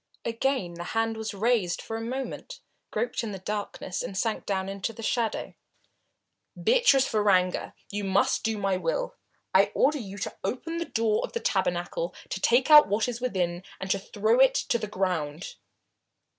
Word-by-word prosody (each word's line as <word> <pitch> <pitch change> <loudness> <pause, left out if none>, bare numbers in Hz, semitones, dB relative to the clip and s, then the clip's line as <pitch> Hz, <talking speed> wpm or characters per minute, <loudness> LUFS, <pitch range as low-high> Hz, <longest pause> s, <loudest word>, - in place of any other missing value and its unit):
Again 230 -5 -1
the 170 0 -6
hand 225 0 +1
was 220 -2 -5
raised 210 -4 +1
for 225 - -6
a 225 - -3
moment, 265 - -5 0.3
groped 480 - -2
in 215 -3 -4
the - - -4
darkness 200 -1 -4
and 190 - -5
sank 225 +1 -1
down 190 -1 -1
into 195 +3 -3
the 225 +1 -9
shadow. 230 0 -1 1.1
"Beatrice 450 - +4
Varanger, 195 -4 +2 0.2
you 205 0 -3
must 195 0 +2
do 220 -1 0
my 195 -2 0
will. - - -2 0.4
I - - +5
order 295 +2 +3
you 200 -4 -7
to 195 - -4
open 330 +7 -3
the 335 - -2
door 225 -5 +1
of - - -5
the 470 - -1
tabernacle, - - -1
to - - -4
take 255 +5 +3
out 300 0 +10
what 210 +3 +1
is 240 -1 -4
within 180 -8 -1 0.2
and 190 0 -3
to 195 - +2
throw 215 +4 +1
it 265 0 +6
to 235 - +1
the 215 - -3
ground!" 180 -5 -2
220 Hz, 175 wpm, -27 LUFS, 195-250 Hz, 1.1 s, out